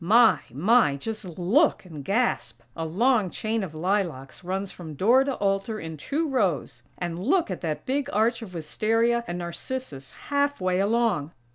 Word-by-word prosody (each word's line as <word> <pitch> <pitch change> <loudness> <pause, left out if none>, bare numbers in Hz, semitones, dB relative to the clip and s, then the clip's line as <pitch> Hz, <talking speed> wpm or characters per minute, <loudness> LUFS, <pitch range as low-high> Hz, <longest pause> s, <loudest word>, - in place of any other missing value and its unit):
My! 225 +7 +6
My! 180 - +4
Just 190 +2 -6
look 215 - +3
and 155 -5 -9
gasp!! 230 - 0
A 165 - -3
long 215 +3 +2
chain 220 +3 -2
of 160 -5 -6
lilacs 170 -5 -2
runs 190 +2 -3
from 160 -4 -9
door 235 - +5
to 275 -1 -2
altar 195 +2 -1
in 160 0 -6
two 290 - -2
rows. 205 - 0 0.2
And 175 -1 -4
look 310 - +1
at 180 - -4
that 155 -3 -3
big 275 +1 -1
arch 225 +4 +2
of 190 -5 -9
wistaria 225 +9 +1
and 175 - -3
narcissus 170 - -6 0.2
half 285 0 +1
way 185 0 +1
along! 200 -7 +1
195 Hz, 165 wpm, -26 LUFS, 170-235 Hz, 0.2 s, My